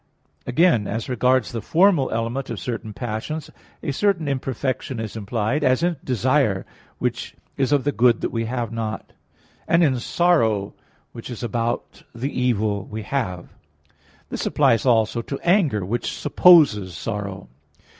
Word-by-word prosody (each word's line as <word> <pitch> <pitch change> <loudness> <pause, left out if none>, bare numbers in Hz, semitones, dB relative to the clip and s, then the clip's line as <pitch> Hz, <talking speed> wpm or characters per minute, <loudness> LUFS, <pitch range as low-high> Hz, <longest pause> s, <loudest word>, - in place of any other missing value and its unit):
Again, 125 - +3
as 115 +3 -3
regards 125 +1 +1
the 115 -2 -4
formal 170 - +3
element 115 +4 -3
of 115 - -4
certain 110 +3 -5
passions 120 +8 -5 0.3
a 145 - -1
certain 175 +1 +1
imperfection 130 -2 -2
is 110 -1 -5
implied, 115 +6 -1
as 130 +4 +2
in 175 -2 +1
desire, 125 -4 +1 0.3
which - - -3 0.2
is 135 0 0
of 145 -3 +3
the 145 - +1
good 120 -3 +3
we 115 -1 -2
have 120 -1 -3
not, 115 -1 -5 0.5
and 165 +1 +4
in 130 -5 +2
sorrow, 115 - +1 0.4
which 115 - -9
is 120 -1 -7
about 115 0 -3
the 130 +5 -3
evil 110 -5 0
we 110 0 -6
have. 95 -9 -3 0.8
This - - -4
applies 115 +3 +2
also 115 -1 +2
to 140 +3 -6
anger, 165 - +2
which 115 +5 -2
supposes 110 - +5
sorrow. 100 -1 -5
120 Hz, 145 wpm, -22 LUFS, 110-140 Hz, 0.8 s, supposes